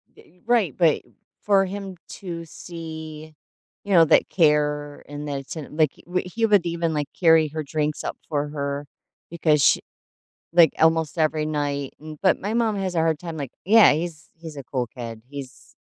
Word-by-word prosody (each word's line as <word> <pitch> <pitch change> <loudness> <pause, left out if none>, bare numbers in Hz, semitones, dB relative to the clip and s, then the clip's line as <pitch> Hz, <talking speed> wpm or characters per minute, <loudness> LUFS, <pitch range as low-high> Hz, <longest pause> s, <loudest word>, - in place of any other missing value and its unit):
Yeah, - - -17
e 180 +2 -26
right, 225 - +2
but 165 -4 +3 0.4
for 195 -2 +3
him 195 0 -6 0.2
to 170 -3 -6
see, 160 -1 -9 0.5
you 200 -1 -2
know, 165 -2 +7
that - - +4
care 150 -3 +1
and 145 +1 -7
that 140 -1 -2
it's 135 - -9
in 150 -2 -8
like, 155 -3 +3
w 180 +1 -1
he 225 +5 -1
would 205 -5 +4
even, 170 -1 -1
like, 145 -1 -1
carry 160 -3 +5
her 155 +1 -4
drinks 150 +1 -2
up - - -4
for 145 -1 -1
her 140 -1 -3 0.5
because 155 -3 +2
sh - - +6 0.8
like, 170 -3 +7
almost 160 0 +2
every 155 -1 +1
night, 145 -2 -2
m 155 0 -9
But 190 - +3
my 205 +3 -3
mom 230 -2 +1
has 190 -2 -2
a 165 - +2
hard 160 -2 +1
time 165 -2 -6
Like, 140 -4 -5
yeah, 220 +3 +7
he's 160 0 -5
he's 160 -2 -10
a 140 - -6
cool 125 -2 -3
kid, 115 -2 -8
he's 135 -2 -10
160 Hz, 190 wpm, -24 LUFS, 145-175 Hz, 0.8 s, know